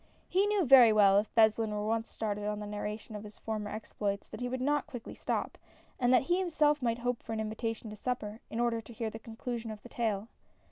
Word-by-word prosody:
He 390 +3 +2
knew 410 -4 +2
very 250 -4 +9
well 200 -2 +6
if 210 - -3
Beslin 220 0 +4
were 210 0 -2
once 225 +1 -1
started 210 -1 -3
on 210 0 -2
the 210 - -5
narration 210 +1 -5
of 210 - -6
his 210 0 -11
former 215 -2 -4
exploits, 205 -2 -4
that - - -8
he 245 0 -2
would 255 +1 -2
not 290 +2 +1
quickly 245 -3 -8
stop, - - -3 0.4
and 245 -1 +3
that 255 - +5
he 350 +6 +1
himself 305 -5 +2
might 230 -2 +1
hope 245 0 -2
for - - -6
an 220 - -2
invitation 220 0 -3
to - - -7
supper, 220 -2 -3
in 225 - -4
order 235 -1 +1
to 235 - -12
hear 220 0 -3
the 225 - -7
conclusion 230 +1 -5
of 215 -1 -8
the 245 - -11
tale. 220 -3 -1
225 Hz, 235 wpm, -31 LUFS, 210-245 Hz, 0.4 s, very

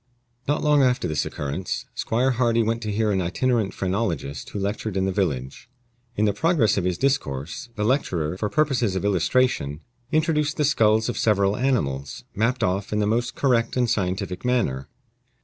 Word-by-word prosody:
Not 145 +1 0
long 150 -1 +4
after 125 -1 +2
this 75 -2 -1
occurrence, 75 +6 -4
Squire 125 +4 +1
Hardy 115 -2 +2
went 115 +1 -1
to 110 -2 -3
hear 105 +1 +1
an 95 -2 +1
itinerant 110 +4 0
phrenologist 90 -8 -3
who - - -6
lectured 100 0 -2
in 95 - +1
the 95 - 0
village. 75 - -2 0.5
In 105 - +2
the 105 - +2
progress 135 - +2
of 95 - -1
his 90 -1 0
discourse, 120 - -2
the 105 - -2
lecturer, 90 - 0
for 105 +2 -2
purposes 130 -9 +1
of 95 - -2
illustration, 95 - +1 0.3
introduced 155 -1 +1
the 150 - +2
skulls 110 -6 +3
of 120 - -3
several 100 -2 +2
animals, 70 - -1
mapped 115 +5 0
off 95 +2 -1
in 105 - 0
the 105 - +2
most 120 +3 0
correct 120 -3 +1
and 125 -1 +2
scientific 95 -4 -2
manner. 110 - 0
105 Hz, 175 wpm, -24 LUFS, 95-125 Hz, 0.5 s, long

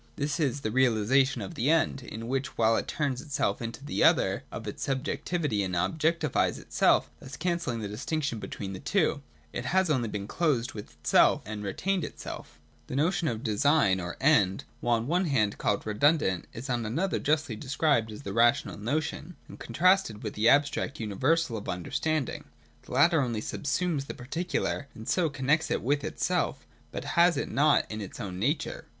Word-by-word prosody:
This 145 +3 -2
is 140 -2 0
the 110 - -2
realisation 130 0 +3
of 95 - -7
the 120 +5 0
End: 160 -4 +2
in 115 -1 -7
which, 135 +2 -2
while 115 0 +4
it - - -1
turns 140 -4 -1
itself 145 -3 -1
into 115 +4 -6
the - - 0
other - - +3
of - - -7
its - - -5
subjec 135 +1 -2
tivity 150 - 0
and 90 -2 -2
objectifies 160 - +1
itself, - - +2
thus 135 - -9
cancelling 170 -9 -1
the 105 - -3
distinc 145 +9 -3
tion 120 -6 -2
between 100 -1 -6
the 95 - -6
two, 175 -7 +1 0.3
it - - -4
has 190 -2 +2
only 120 -6 +1 0.2
closed 130 -2 0
with 105 -6 -9
itself, 75 0 +3
and 105 0 -5
retained 180 - -1
itself - - -8 0.3
The - - -5
notion 165 +3 +1
of 115 -4 -2
Design 110 -3 +3
or 90 -1 -5
End, 105 -10 +3 0.2
while 120 -1 +2
on 115 - -4
one 175 +7 +1
hand 110 -10 +1
called 100 - 0
redundant, 110 - +2
is 120 +4 -7
on 120 -3 -1
another 165 - -1
justly 150 -5 0
described 130 -2 +1
as 105 - -9
the 100 - -5
rational 120 +2 +3
notion, 155 +8 -3
and - - -12
contrasted 180 - +2
with 105 - -4
the 110 +2 +3
abstract 145 -1 +2
uni 105 -3 -4
versal 135 +2 +1
of 100 - -8
understanding. 140 - -2 0.4
The - - -8
latter 155 +4 +5
only 120 -4 -1
subsumes 150 -1 -1
the - - -6
particular, 145 +2 -2
and 110 - -10
so 175 -4 +2
connects 145 +3 +1
it - - -1
with 145 +3 +1
itself: - - -1 0.3
but - - -5
has 170 -2 +3
it - - -3
not 150 +1 +4
in 110 0 -4
its 100 - -8
own 95 -5 -5
nature. 140 - -1
135 Hz, 185 wpm, -28 LUFS, 110-155 Hz, 0.4 s, latter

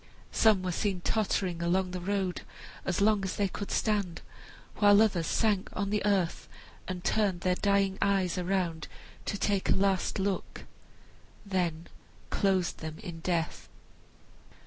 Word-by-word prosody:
Some 215 -4 +4
were 180 - -1
seen 190 0 -1
tottering 190 -4 0
along 180 +2 +1
the 180 - -4
road, 190 0 -1 0.4
as 185 0 0
long 210 -1 +3
as 190 - -2
they 205 - +1
could 200 +2 -6
stand, 200 -5 0 0.6
while 205 -1 +6
others 195 -7 +2
sank 210 -4 +1
on 200 -1 -2
the 210 - 0
earth, 190 -5 0 0.4
and 180 -1 -5
turned 195 -5 +1
their 180 0 +2
dying 195 0 +1
eyes 195 -3 +2
around 180 -3 -1 0.4
to 200 - -2
take 200 -1 0
a - - +5
last 195 -1 +1
look, 195 -1 -2 0.8
then 175 -4 -1 0.5
closed 190 -3 +1
them 160 -1 -6
in 170 -2 -7
death. 165 -1 -2
190 Hz, 145 wpm, -30 LUFS, 180-200 Hz, 0.8 s, while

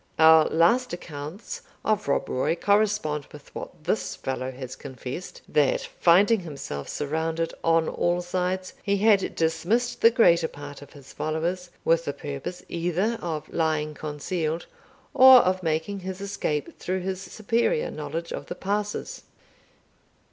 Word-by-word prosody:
Our 160 0 +7
last 205 +10 +3
accounts 160 +2 -7 0.2
of 215 -7 +1
Rob 140 - +1
Roy 130 +5 0
correspond 200 -6 +1
with 150 -1 -14
what - - -8
this 185 +6 -1
fellow 130 -1 -3
has 130 -1 -7
confessed, 130 +5 -8
that, 145 -3 +2 0.2
finding 200 +6 +5
himself 140 - -6
surrounded 160 +3 -2
on 165 -1 +3
all 175 +1 0
sides, 185 +1 -2
he 200 -1 +1
had 205 -1 +3
dismissed 220 +9 0
the 230 - +8
greater 175 -9 +4
part 145 -1 -10
of 145 - -13
his 140 -2 -14
followers, 170 +3 -2 0.2
with 165 0 +3
the 145 - -2
purpose 145 +6 -6
either 180 +7 -1
of 155 -3 -4
lying 155 -2 0
concealed, 155 +2 -3 0.5
or 260 -1 +9
of 185 0 0
making 160 +4 -1
his 190 0 -6
escape 195 -7 -3
through 185 +1 -2
his 190 0 -3
superior 235 - 0
knowledge 160 +3 -5
of - - -6
the - - -5
passes." 205 +1 -3
170 Hz, 140 wpm, -26 LUFS, 150-195 Hz, 0.5 s, or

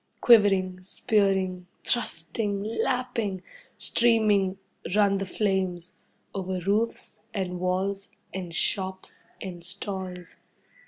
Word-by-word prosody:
Quivering, 195 -5 +5
spearing, 190 -2 +1 0.2
thrusting, 200 -1 0
lapping, 225 -3 -1 0.3
streaming, 210 -5 +3 0.4
run 200 -2 +4
the 195 - -3
flames. 185 -3 -1 0.4
Over 190 -1 -2
roofs, 210 +4 0 0.2
and 180 -2 -2
walls, 190 +2 -1 0.2
and 185 -3 -5
shops, 190 +2 -2 0.2
and 175 -3 -7
stalls. 185 -1 -5
190 Hz, 90 wpm, -27 LUFS, 185-205 Hz, 0.4 s, Quivering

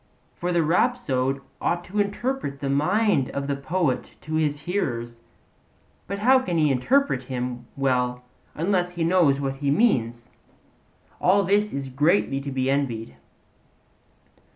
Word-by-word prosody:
For 175 +1 -3
the 170 -1 +2
rhapsode 150 - +1 0.2
ought 175 0 0
to 205 +4 -4
interpret 205 - -2
the 140 -1 -2
mind 180 - +2
of 140 0 -3
the 140 0 -1
poet 140 0 -2
to 155 - -7
his 150 -2 0
hearers, 120 -10 -3 0.9
but 200 - -3
how 255 +6 +5
can 180 -10 -2
he 150 -3 +3
interpret 135 - +2
him 125 -1 -5
well 125 -2 0 0.3
unless 180 +2 +1
he 170 -2 -2
knows 165 -5 +3
what 135 -1 -3
he 140 0 -1
means? 120 - +1 0.9
All 200 +3 +4
this 205 +3 +2
is 140 -1 -4
greatly 140 +1 +1
to 140 0 -5
be 130 0 -1
envied. 125 - -1
145 Hz, 140 wpm, -24 LUFS, 130-185 Hz, 0.9 s, how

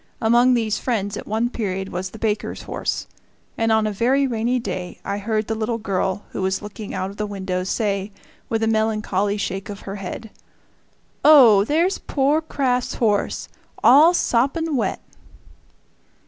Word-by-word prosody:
Among 240 +3 +4
these 220 -3 0
friends 205 -5 -2
at - - -7
one 225 +3 0
period 195 -4 -3
was 185 +1 -4
the 220 - -11
baker's 215 -1 -2
horse, - - -3 0.5
and 225 0 +1
on 220 0 +3
a 215 - 0
very 255 +7 +2
rainy 240 0 0
day 185 -7 -5
I 200 - -2
heard 215 +1 -1
the 225 - -2
little 225 +1 -2
girl, 195 -2 -2
who - - -4
was 190 0 0
looking 210 0 -8
out 190 +1 -3
of 200 - -14
the 210 - -2
window, 190 -2 -3
say, 200 0 -1 0.4
with 225 0 0
a - - +2
melancholy 215 -2 0
shake 200 +1 -4
of 205 -1 -7
her 195 +1 -6
head, 200 +3 -7 0.9
"Oh! 245 -10 +7
there's 335 - +1
poor 290 +3 +1
Kraft's 260 -5 -1
horse, 210 -4 0 0.4
all 310 +7 +7
soppin' 285 +5 +1
wet!" 250 - -1
220 Hz, 160 wpm, -22 LUFS, 200-245 Hz, 0.9 s, Oh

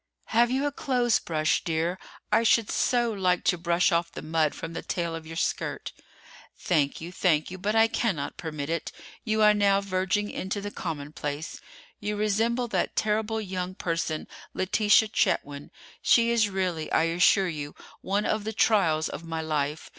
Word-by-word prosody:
"Have 235 +1 +4
you 265 +3 0
a 290 - 0
clothes 250 -5 +1
brush, 155 -2 0
dear: 165 +2 -1 0.3
I 225 - +4
should 230 -1 +3
so 240 -2 +1
like 180 -3 +1
to 180 - +3
brush 170 +2 +2
off 170 0 0
the - - -8
mud 155 -1 +1
from 165 0 -6
the - - -4
tail 170 -2 -3
of 165 -1 -7
your 165 - -8
skirt." - - -2 0.6
"Thank 150 -5 0
you, 170 +2 -7
thank 170 -3 +1
you; 185 - -7
but 210 +4 -1
I 225 0 +6
cannot 190 -11 -2
permit 155 -4 -5
it. 165 -1 -3 0.3
You 220 -1 +1
are 210 0 +7
now 200 -1 +3
verging 195 +1 -1
into 190 +2 -3
the 205 +1 -5
commonplace. 150 -2 -5 0.4
You 210 0 -3
resemble 225 +4 0
that - - -1
terrible 220 +1 0
young 185 -3 -4
person, 165 -3 -2 0.3
Letitia 210 +3 +3
Chetwynd. 145 -8 -1 0.3
She 235 0 +4
is 225 -3 +3
really, 185 -5 -2
I - - +3
assure 180 +3 +3
you, 150 -4 -5 0.3
one 200 +2 -1
of 215 -1 0
the 220 +1 -4
trials 175 -8 +2
of - - -7
my 165 -1 -4
life. 150 -1 -2
185 Hz, 175 wpm, -27 LUFS, 165-215 Hz, 0.6 s, are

